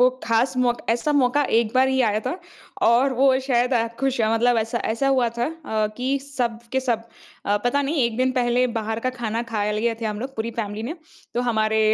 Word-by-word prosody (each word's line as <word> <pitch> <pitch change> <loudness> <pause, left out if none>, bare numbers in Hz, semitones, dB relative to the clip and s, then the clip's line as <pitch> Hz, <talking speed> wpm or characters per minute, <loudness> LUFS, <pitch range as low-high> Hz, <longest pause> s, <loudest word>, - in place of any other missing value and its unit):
वो 250 - +7 0.2
ख़ास 230 +3 +1
मौका 245 -1 +1
ऐसा 295 +6 0
मौका 285 +1 +3 0.2
एक 225 -2 -3
बार 260 +1 +4
ही 265 0 +1
आया 210 +1 0
था। 355 - -2 0.5
और 255 +4 +4
वो 260 +1 +4
शायद 250 -1 +2
अ, 230 -1 +2
खुश 270 -2 0
मतलब 225 +2 +3
ऐसा 225 +2 -1
ऐसा 230 +5 0
हुआ 260 -3 +3
था 240 - +1
अ, 295 -10 -2
कि 265 +2 0
सब 250 -5 -3
के 265 - +2
सब 235 -3 -1 0.4
अ, 205 +1 +2
पता 280 +4 +2
नहीं 280 -2 +1
1 235 -2 -1
दिन 255 +1 +1
पहले 250 0 +2
बाहर 225 0 -2
का - - +2
खाना 235 -2 -3
खा 210 -2 0
लिए 225 +2 0
थे 225 - -4
हम 210 0 -3
लोग 265 +2 -6
पूरी 220 +1 -2
फैमिली 210 -1 -3
ने। 260 +8 -4 0.4
तो 240 - +1
हमारे 220 -1 +1
240 Hz, 220 wpm, -23 LUFS, 225-265 Hz, 0.5 s, वो